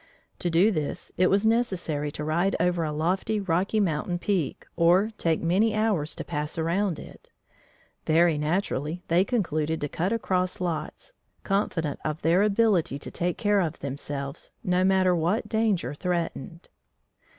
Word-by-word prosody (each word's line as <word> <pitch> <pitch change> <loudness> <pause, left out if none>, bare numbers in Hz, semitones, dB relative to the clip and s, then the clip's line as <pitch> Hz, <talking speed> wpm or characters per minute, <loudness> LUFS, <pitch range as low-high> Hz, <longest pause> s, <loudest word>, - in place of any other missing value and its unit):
To 175 - -1
do 175 +6 +4
this, 155 -1 -3
it 185 - +3
was 200 +3 +2
necessary 185 -10 0
to 150 - -5
ride 170 +6 +1
over 175 -1 +1
a 155 - -2
lofty 185 +8 0
Rocky 195 +3 0
Mountain 175 -2 0
peak 180 -5 -2
or 180 +6 +4
take 165 -1 +1
many 205 +6 +2
hours 200 -9 0
to - - -5
pass 150 +3 -4
around 170 +2 0
it. - - -13 0.8
Very 165 -1 +4
naturally 160 0 -1
they 170 +3 +4
concluded 160 - -1
to 145 - -1
"cut 175 +7 -2
across 185 -5 0
lots," 175 - -4 0.3
confident 170 -7 -1
of 155 +1 -3
their 170 +4 +4
ability 205 - +2
to 140 - -7
take 175 0 -2
care 205 -1 +2
of 165 -5 -1
themselves, 140 0 -6
no 180 0 +2
matter 190 -1 +3
what 180 +7 0
danger 210 - 0
threatened. 170 -1 -4
175 Hz, 150 wpm, -26 LUFS, 155-195 Hz, 0.8 s, do